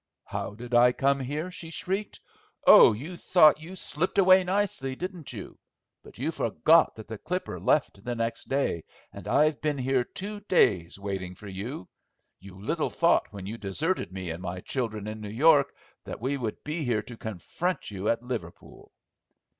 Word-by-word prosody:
"How 100 - -5
did 120 +2 -9
I 120 +1 +6
come 140 +2 +2
here," 150 +7 -4
she 170 -2 -7
shrieked. 190 +5 -3 0.4
"Oh, - - +9
you 145 +12 -6
thought 155 -3 +5
you 175 +4 -9
slipped 180 +1 -2
away 190 -1 +7
nicely, 180 -9 -1
didn't 180 -1 -6
you? 105 -6 -9 0.4
But - - -15
you - - -1
forgot - - +3
that 110 -2 -10
the 110 -2 -7
Clipper 185 +1 -4
left 115 -9 +1
the 120 0 -3
next 115 0 -3
day, 135 - 0 0.3
and - - -9
I've 150 0 +2
been 150 -2 0
here 130 -1 +1
two 205 +10 -6
days 100 - +2
waiting 95 -2 -5
for 105 - -12
you. 100 +3 -6 0.5
You 95 0 -13
little 155 - -1
thought 170 - +2
when 100 -2 -9
you 110 +4 -6
deserted 130 - -2
me 95 -2 -5
and 85 +2 -6
my 90 0 -5
children 110 -4 -3
in 110 0 -6
New 105 - -6
York 140 +5 +4 0.3
that - - -7
we 130 +5 -1
would 120 -6 -4
be 155 +2 -3
here 115 -5 0
to 120 - -10
confront 110 - -4
you 100 +1 -2
at 115 +1 0
Liverpool." 115 -9 -7
125 Hz, 180 wpm, -27 LUFS, 105-160 Hz, 0.5 s, Oh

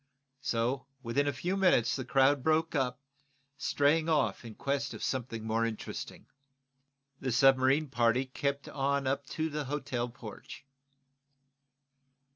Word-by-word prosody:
So, 125 +4 -1 0.2
within 135 +5 0
a - - +2
few 175 +8 -2
minutes 180 -12 +3
the 130 - -3
crowd 135 +2 +3
broke 160 +3 +2
up, 130 -3 0 0.6
straying 155 +3 +2
off 155 -4 +1
in 115 -2 -9
quest 140 0 -2
of - - -7
something 115 -4 -3
more 110 +1 +1
interesting. 115 -2 -5 0.9
The 130 - -2
submarine 135 +4 +4
party 120 0 +2
kept 140 +2 -3
on 140 0 0
up 135 +1 -1
to 160 0 -2
the 150 -1 -3
hotel 135 -3 -2
porch. 115 +2 -10
135 Hz, 130 wpm, -31 LUFS, 125-145 Hz, 0.9 s, submarine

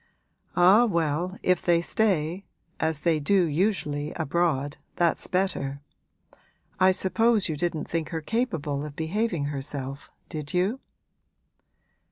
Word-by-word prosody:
'Ah, 190 +6 +6
well, 170 -1 -1
if 180 -2 +2
they 170 -1 +3
stay, 180 -1 0 0.3
as 160 -2 -1
they 165 -3 +2
do 185 +6 +3
usually 150 -3 -1
abroad, 155 -3 0 0.2
that's 170 -1 +1
better. 180 -7 -1 1.0
I 185 0 +6
suppose 205 +3 +3
you 160 - -2
didn't 165 0 -2
think 165 -2 -2
her 165 - -3
capable 160 - -2
of 150 -1 -7
behaving 170 0 -1
herself, 140 0 -5 0.2
did 150 +1 -5
you?' 195 +9 +1
170 Hz, 120 wpm, -26 LUFS, 150-185 Hz, 1.0 s, Ah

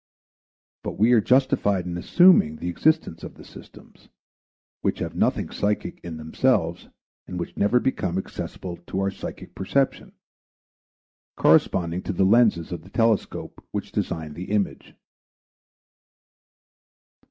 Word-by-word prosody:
But - - -4
we 110 +4 +4
are 120 -3 +6
justified 125 -7 +2
in 90 -1 -4
assuming 90 - +5
the 85 - -4
existence 155 - +1
of - - -8
the - - -13
systems, - - -16 0.7
which - - 0
have - - -5
nothing - - 0
psychic 105 0 -2
in 85 -2 -6
themselves 85 +1 0 0.4
and 90 - -5
which 85 - -5
never 105 +5 +3
become 95 -9 -1
accessible 90 -1 -6
to 90 +2 -5
our 95 0 0
psychic - - -8
perception, 135 +8 -1 1.2
corresponding 90 - +3
to 100 - -4
the 95 +2 +2
lenses 105 -5 +3
of 85 -2 -5
the 90 - -16
telescope 115 -2 -1
which - - -5
design 80 -3 -3
the 90 +5 -7
image. 105 0 -2
95 Hz, 130 wpm, -24 LUFS, 85-115 Hz, 1.2 s, are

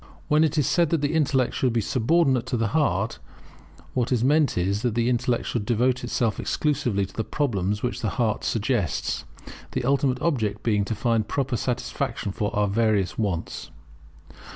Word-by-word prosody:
When 150 +1 +4
it 155 -1 +1
is 150 - +3
said 170 +2 +2
that 165 -2 +1
the 145 +1 0
intellect 140 -6 +2
should 130 -2 0
be 115 - +2
subordinate 130 +3 +2
to 130 -1 -1
the 115 -2 0
heart, 110 - 0 0.7
what 125 -1 0
is 120 -2 +2
meant 145 -1 +3
is, 100 +3 0
that 120 -3 -1
the 120 0 +1
intellect 120 0 0
should 115 - -2
devote 125 +3 +1
itself 120 -2 -1
exclusively 125 -10 0
to - - -14
the 110 - -1
problems 105 -9 -1
which 125 - -2
the 110 - 0
heart 110 -4 0
suggests, 110 -4 -1 0.5
the - - -1
ultimate 135 -1 +2
object 115 -11 -1
being 105 -3 +2
to 110 - -3
find 115 -1 0
proper 135 -3 -1
satisfaction 120 -4 -2
for 105 0 -2
our 105 0 +2
various 105 -2 +1
wants. 95 -7 -3
120 Hz, 175 wpm, -25 LUFS, 105-135 Hz, 0.7 s, When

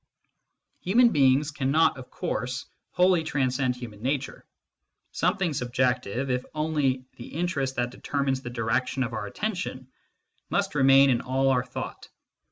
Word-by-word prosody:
Human 235 +6 +5
beings 140 - +3
cannot, 145 +3 +2
of 125 - -11
course, 125 +1 -3 0.2
wholly 180 -2 +3
transcend 130 -3 0
human 115 -4 -9
nature; 135 +2 -2 0.7
something 180 -1 0
subjective, 125 -1 -1
if 125 0 0
only 145 -4 0
the 120 - -9
interest 150 -5 -2
that 120 0 -1
determines 135 0 -2
the 120 - -6
direction 125 +3 -1
of 125 -1 -4
our 105 -2 -3
attention, 175 - -4 0.6
must - - 0
remain 135 -1 +6
in 120 - +1
all 135 +1 +1
our 125 -2 +2
thought. 125 - -7
130 Hz, 135 wpm, -26 LUFS, 125-150 Hz, 0.7 s, remain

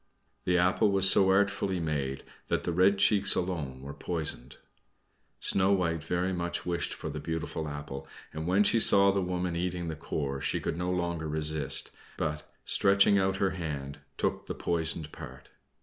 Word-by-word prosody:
(The 90 0 +3
apple 95 +4 +3
was 95 -1 +3
so 95 0 +5
artfully 95 -1 +1
made 70 -5 -2 0.2
that - - -1
the - - -1
red 95 +3 +4
cheeks 100 0 +3
alone 75 -8 -3
were 70 +1 -7
poisoned.) 80 -8 -3 0.8
Snow 95 +1 +3
White 85 -4 0
very 90 +3 -1
much 85 -1 -3
wished 85 -1 -1
for - - -5
the - - -5
beautiful 80 -1 -4
apple, 70 -2 -7 0.3
and 80 +1 -4
when 95 +3 +4
she 115 - +3
saw 100 -2 +6
the 100 0 0
woman 90 -1 -2
eating 85 -1 -2
the 80 - -4
core 70 -3 -4
she - - 0
could - - -3
no 90 +1 -2
longer 85 -3 -2
resist, 75 -3 +1 0.3
but, 75 0 -3
stretching 100 0 +4
out 95 0 +1
her 95 0 +1
hand, 75 -5 -5 0.2
took - - -2
the - - -4
poisoned 80 -2 -2
part. - - -11
85 Hz, 170 wpm, -29 LUFS, 75-95 Hz, 0.8 s, saw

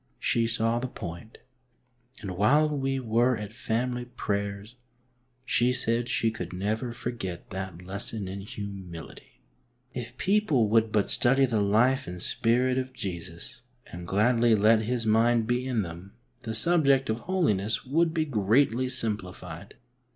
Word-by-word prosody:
She 115 -1 +1
saw 115 +1 +1
the 130 - -3
point, 85 0 -8 0.8
and 100 -3 -5
while 145 +10 +3
we 135 -1 -1
were 120 +1 +2
at 105 0 -7
family 120 +2 -2
prayers, 100 -2 -3 0.7
she 125 -1 +2
said 120 -1 0
she 115 -3 +1
could 90 -5 -6
never 110 +6 -2
forget 115 -7 -5
that 95 -2 -6
lesson 100 +2 -3
in 95 +1 -5
humility. 95 -11 -9 0.5
If 120 0 -6
people 185 - +2
would 110 0 +3
but 105 -2 +2
study 135 +2 +3
the 115 -5 0
life 125 +7 +3
and 90 0 -6
spirit 125 +7 +1
of 130 0 -5
Jesus, 95 +2 -6 0.3
and 85 0 -8
gladly 115 +3 +3
let 110 +2 +5
His 115 +1 -2
mind 115 +1 +3
be 120 +2 0
in 120 -5 0
them, 85 +3 -9 0.3
the 115 -4 -5
subject 140 -1 +3
of 110 - -2
holiness 115 - 0
would 160 +5 +2
be 160 -1 0
greatly 125 +1 +2
simplified. 105 -7 -4
115 Hz, 145 wpm, -27 LUFS, 100-125 Hz, 0.8 s, let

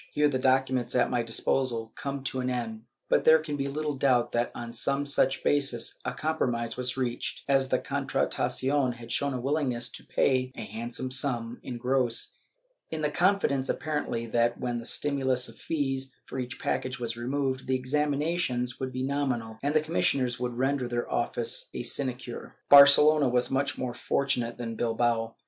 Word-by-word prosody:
* - - -33
Here 150 0 +4
the 135 -3 0
documents 130 -1 +1
at 125 - +3
my 120 - +1
disposal 115 0 -1
come 140 -1 -4
to 130 -1 -2
an 125 0 -1
end, 115 -3 -4 0.2
but - - +3
there 160 0 +7
can 155 -2 -4
be 140 -1 -2
little 150 +1 -2
doubt 130 -3 +2
that, 120 0 0
on 120 -1 -6
some 140 +3 0
such 140 -1 +1
basis, 135 -5 +1
a - - -2
compromise 120 -7 -1
was 125 0 -2
reached, 125 -2 -3
as 135 -1 +2
the - - +3
Contratacion 135 -1 0
had 115 0 -10
shown 140 +2 0
a - - -2
willingness 130 -3 -1
to - - -10
pay 130 -1 +1
a 115 - -6
handsome 115 +4 -4
sum 125 -3 0
in 125 -2 -6
gross, 125 -1 0 0.5
in 155 -1 -4
the 150 - +1
confidence 175 -7 +2
apparently, 145 -6 -2
that 120 +1 +1
when 120 -1 -2
the 115 - -8
stimulus 130 -3 0
of - - -12
fees 135 -4 -2
for 130 - -6
each 125 +1 -5
package 130 -1 -2
was 115 -1 -3
removed, 130 +2 -2
the 130 - +2
examinations 140 -1 0
would 130 -1 -3
be 130 0 -3
nominal 130 -5 -2
and 145 +2 -1
the 155 - +5
commis 160 +2 0
sioners 125 -2 -1
would 125 -1 -3
render 135 0 0
their 120 0 -2
office 120 0 -1
a - - -3
sinecure. 125 -1 -4
Barcelona 145 0 +8
was 125 0 +1
more 135 -2 -1
fortunate 125 -2 -1
than 115 -1 -4
Bilbao. 115 0 0
130 Hz, 180 wpm, -28 LUFS, 120-140 Hz, 0.5 s, Barcelona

